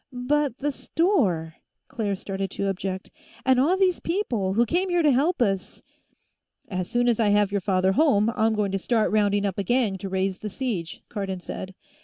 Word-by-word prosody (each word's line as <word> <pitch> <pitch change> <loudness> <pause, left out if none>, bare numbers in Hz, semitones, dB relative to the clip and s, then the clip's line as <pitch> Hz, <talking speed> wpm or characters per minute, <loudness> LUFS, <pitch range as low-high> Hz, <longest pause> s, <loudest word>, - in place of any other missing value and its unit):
"But 290 -2 +1
the 290 +1 -1
store," 210 - 0 0.3
Claire 205 -4 -2
started 195 0 -4
to 195 +1 -2
object. 190 0 -4 0.3
"And 260 -1 +4
all 330 +8 +3
these 370 -2 +2
people 240 - -1
who 235 +2 +4
came 360 - 0
here 350 -1 +2
to 300 - +5
help 280 +3 +2
us 195 -4 -3 0.4
" - - -50 0.3
"As 185 -3 -3
soon 245 0 +1
as 235 -2 +2
I 215 -2 +3
have 205 -1 +3
your 200 -1 0
father 190 0 +2
home, 225 -3 +3
I'm 220 0 +2
going 205 -2 0
to 195 - -1
start 225 +2 +1
rounding 205 -1 +2
up 195 -1 -2
a - - 0
gang 220 -3 +1
to 195 - -5
raise 190 0 -1
the 215 - -5
siege," 195 -8 -4
Cardon 195 -3 -4
said. 185 +1 -7
210 Hz, 200 wpm, -25 LUFS, 190-260 Hz, 0.4 s, to